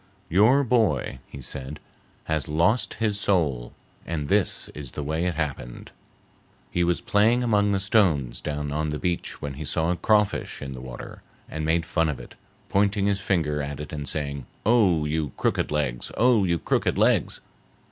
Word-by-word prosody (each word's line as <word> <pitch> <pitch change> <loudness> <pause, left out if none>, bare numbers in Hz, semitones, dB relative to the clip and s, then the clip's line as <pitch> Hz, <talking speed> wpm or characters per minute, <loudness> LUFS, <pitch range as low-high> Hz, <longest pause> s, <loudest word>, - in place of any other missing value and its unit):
"Your 110 - +5
boy," 110 - +1
he 70 - -10
said, 70 +4 -6 0.4
"has 80 -1 -1
lost 85 +10 +1
his 105 -2 0
soul, 75 -13 0 0.3
and 75 -4 -4
this - - +1
is 70 -4 -8
the 75 - -4
way 80 +4 -1
it 90 - -1
happened. 70 -6 -4 0.8
He 90 - +1
was 85 0 +1
playing 115 +4 +3
among 105 -3 +2
the 100 - +2
stones 85 - +2
down 75 -1 -3
on 75 +1 -1
the 75 - -2
beach 85 +2 -3
when 70 -1 -3
he 75 +3 -6
saw 80 +4 0
a - - +1
crawfish 105 +3 +1
in 70 -1 -6
the 65 -1 -7
water, 65 -1 -9 0.3
and 80 - -5
made 80 +1 +1
fun 80 0 +1
of 75 - -3
it, - - -11 0.3
pointing 100 0 +2
his 100 -1 +1
finger 80 -6 0
at 70 0 -5
it 75 - -7
and 75 -2 -4
saying, 70 -4 -3 0.2
'Oh, 100 -9 +4
you 75 -2 -2
crooked - - 0
legs! 70 -5 -1
Oh, 120 -4 +4
you 85 -2 +1
crooked - - 0
legs! - - +2
80 Hz, 175 wpm, -25 LUFS, 75-100 Hz, 0.8 s, Your